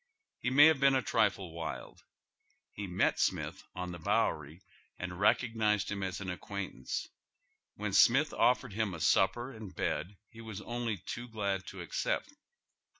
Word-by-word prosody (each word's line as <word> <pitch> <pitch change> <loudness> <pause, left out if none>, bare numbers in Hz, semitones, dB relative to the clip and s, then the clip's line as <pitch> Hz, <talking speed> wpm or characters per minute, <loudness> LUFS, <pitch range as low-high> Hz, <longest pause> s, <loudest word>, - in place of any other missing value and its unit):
He 125 - -1
may 140 +3 +8
have 160 -3 +5
been 135 0 +5
a 130 - +1
trifle 95 -4 +1
wild. 80 -1 -6 0.7
He 100 -1 -6
met 90 +1 +1
Smith - - -1
on 90 0 -4
tlie 85 -2 -9
Bowery 75 +5 0 0.3
and 90 0 -5
recog 110 +6 +2
nized 105 -2 +1
iiim 100 - -4
as 95 -2 -3
an 95 -2 -4
acquaintance. 95 -7 -5 0.7
When 105 -1 -3
Smith 135 +10 +5
offered 125 -2 +2
him 105 -3 -1
a - - -8
supper 95 - +2
and 110 -7 -10
bed 95 +4 -2
he 115 - -13
was 110 -3 -7
only 120 0 -3
too 120 +7 -6
glad 100 -4 -2
to - - -7
accept. - - -2
100 Hz, 160 wpm, -32 LUFS, 90-120 Hz, 0.7 s, may